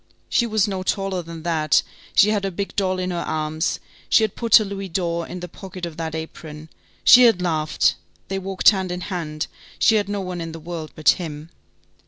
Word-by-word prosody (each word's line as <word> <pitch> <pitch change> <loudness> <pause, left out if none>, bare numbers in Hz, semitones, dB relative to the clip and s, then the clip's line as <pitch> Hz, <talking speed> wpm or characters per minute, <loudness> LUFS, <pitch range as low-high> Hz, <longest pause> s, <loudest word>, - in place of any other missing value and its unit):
She 235 - +2
was 215 -3 +2
no 190 -2 -3
taller 195 -1 -1
than 165 -1 -9
that, 155 -3 +2 0.3
she 210 - +6
had 210 -2 0
her 195 - 0
big 195 +2 -5
doll 185 -2 0
in 185 0 -2
her 175 - -3
arms, 155 +1 -2 0.3
she 225 - +5
had 215 - 0
put 230 -2 +3
her 215 - +7
louis 195 -1 -5
d'or 170 -1 -2
in 180 - -7
the 180 - -5
pocket 185 +1 -8
of 170 -2 -7
that 160 -1 -4
apron, 160 -1 -8 0.3
she 250 - +9
had 225 -6 +5
laughed, 160 -4 +1 0.3
they 195 0 -2
walked 190 0 +4
hand 190 -3 -3
in 180 0 -4
hand, 160 -5 -4 0.3
she 225 - +4
had 205 -1 -1
no 205 -1 -2
one 180 -2 -5
in 165 -1 -6
the 165 - -7
world 165 -1 -6
but 155 - +3
him. 160 -2 -1
180 Hz, 215 wpm, -22 LUFS, 160-195 Hz, 0.3 s, she